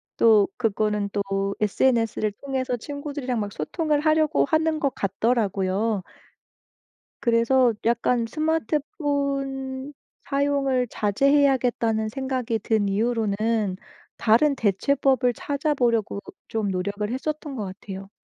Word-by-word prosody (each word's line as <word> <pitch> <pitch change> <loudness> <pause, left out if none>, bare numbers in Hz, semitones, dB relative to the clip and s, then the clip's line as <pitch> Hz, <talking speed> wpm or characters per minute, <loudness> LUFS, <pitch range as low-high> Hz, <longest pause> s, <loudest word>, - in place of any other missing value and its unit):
또 215 -3 +5
그거는 210 -3 0
또 195 -1 -1
SNS를 220 -1 +1
통해서 260 0 -3
친구들이랑 285 -2 -4
막 205 -1 -3
소통을 300 - -1
하려고 310 -1 +3
하는 315 +1 +1
것 280 -4 0
같더라고요. 200 -1 0 1.2
그래서 235 +1 +3
약간 235 0 +2
스마트폰 280 -3 -2 0.4
사용을 275 -3 +1
자제해야겠다는 240 -2 +2
생각이 255 -3 -2
든 210 -1 +1
이후로는 215 -2 0 0.4
다른 260 +6 +4
대체법을 250 +4 +2
찾아보려고 245 -8 0 0.3
좀 215 -3 -2
노력을 200 +3 -2
했었던 295 +1 -4
것 210 -4 -3
같아요. 195 0 -8
240 Hz, 265 characters per minute, -24 LUFS, 210-275 Hz, 1.2 s, 또